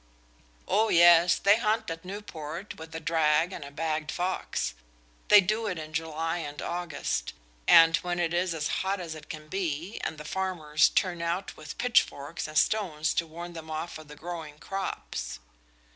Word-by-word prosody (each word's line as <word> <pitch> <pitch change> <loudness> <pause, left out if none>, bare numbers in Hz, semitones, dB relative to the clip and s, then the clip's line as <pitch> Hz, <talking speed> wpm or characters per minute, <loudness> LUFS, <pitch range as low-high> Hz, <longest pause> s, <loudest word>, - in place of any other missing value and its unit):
"Oh 220 +1 +3
yes, 170 0 +7
they 200 +2 +5
hunt 220 -2 0
at 165 0 -6
Newport 180 -3 -7
with 160 0 -9
a - - -2
drag 160 +2 +2
and 165 - -6
a 140 - -8
bagged 155 +1 -2
fox. 180 - -2 0.5
They 210 -1 +9
do 215 +4 0
it 185 -4 -2
in 155 0 -7
July 165 +1 -2
and 145 -2 -6
August, 175 -3 -3 0.7
when 175 0 -2
it 170 -1 0
is 175 -1 +1
as 150 -1 -1
hot 195 +1 -1
as 170 -3 -5
it 155 -1 -11
can 155 -1 -7
be, 175 +1 -3
and 155 - -3
the 150 - -9
farmers 160 -4 +1
turn 180 -3 0
out 170 +3 -2
with 155 - -9
pitchforks 170 -11 +1
and 155 - -4
stones 160 -3 +2
to 165 - 0
warn 170 +2 -8
them 160 -1 -9
off 160 +2 -4
the 150 -1 -11
growing 160 -2 -7
crops." 150 - -4
165 Hz, 170 wpm, -28 LUFS, 155-185 Hz, 0.7 s, They